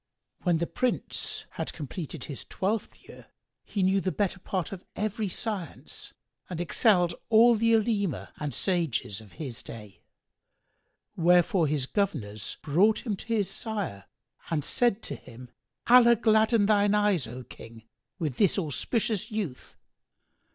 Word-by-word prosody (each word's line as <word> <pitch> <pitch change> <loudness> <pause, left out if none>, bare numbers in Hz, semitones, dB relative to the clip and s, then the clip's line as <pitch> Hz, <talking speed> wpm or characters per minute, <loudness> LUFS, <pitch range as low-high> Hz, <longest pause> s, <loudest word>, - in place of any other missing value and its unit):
When 175 -3 +2
the 170 - 0
Prince 255 +7 -2
had - - -4
completed 150 +1 -6
his 140 - -5
twelfth 205 +3 -3
year, - - -13 0.4
he 200 - -2
knew 190 +1 +3
the 185 - -1
better 195 -1 -1
part 185 -2 -3
of 190 -2 -7
every 210 0 -2
science 195 -4 -5 0.4
and 175 - -5
excelled 175 0 +3 0.2
all 230 +2 +7
the 230 +1 +3
Olema 210 -5 0
and 150 -1 -2
sages 160 - 0
of 105 - -16
his 140 -7 -6
day: 105 -4 -11 1.1
wherefore 175 +1 +4
his 145 -2 0
governors 130 - -2
brought 195 - +3
him 215 -4 -1
to 195 - -12
his 210 -4 0
sire 195 - -4 0.4
and 150 -4 -1
said 235 -3 +1
to - - -4
him, 120 +1 -13 0.3
"Allah 235 -1 +7
gladden 220 0 +4
thine 205 0 +4
eyes, 205 - +2
O 125 +3 -7
King, 115 -2 -12 0.3
with 155 -9 -3
this 200 -2 +3
auspicious 200 - -1
youth! 205 - -5
190 Hz, 140 wpm, -28 LUFS, 150-215 Hz, 1.1 s, all